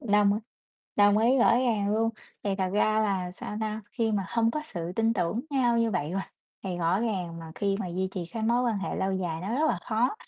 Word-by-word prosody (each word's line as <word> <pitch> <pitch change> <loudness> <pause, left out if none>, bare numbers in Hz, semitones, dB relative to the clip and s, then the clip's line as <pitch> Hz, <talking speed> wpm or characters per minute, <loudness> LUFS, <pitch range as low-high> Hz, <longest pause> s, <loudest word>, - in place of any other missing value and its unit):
Đông 205 -5 +4
á 205 - 0 0.6
đồng 205 0 +5
ý, 240 +4 +4
rõ 240 - +5
ràng 220 -5 +1
luôn 225 +1 +2 0.3
thì 205 - -1
thật 190 -1 +1
ra 215 +1 +3
là, 190 -4 0
sao 210 +3 -6
ta, 215 0 -2
khi 230 -3 0
mà 200 -2 0
hông 230 -1 +2
có 305 - -2
sự 175 - -5
tin 225 0 +3
tưởng 185 +2 0
nhau 245 -4 +2
như 230 -1 +2
vậy 175 -6 -1
rồi 195 - 0 0.4
thì 185 -2 -2
rõ 175 +4 +2
ràng 185 -7 -2
mà 165 -1 -9
khi 200 -1 0
mà 195 - -2
duy 185 +2 -1
trì 185 -2 -4
cái 225 -2 -3
mối 235 +2 +2
quan 230 -5 +1
hệ 195 - -3
lâu 190 0 0
dài 175 -4 -2
nó 200 +6 -2
rất 305 +4 +2
là 190 - +1
khó, 235 - +1
210 Hz, 245 wpm, -28 LUFS, 185-230 Hz, 0.6 s, đồng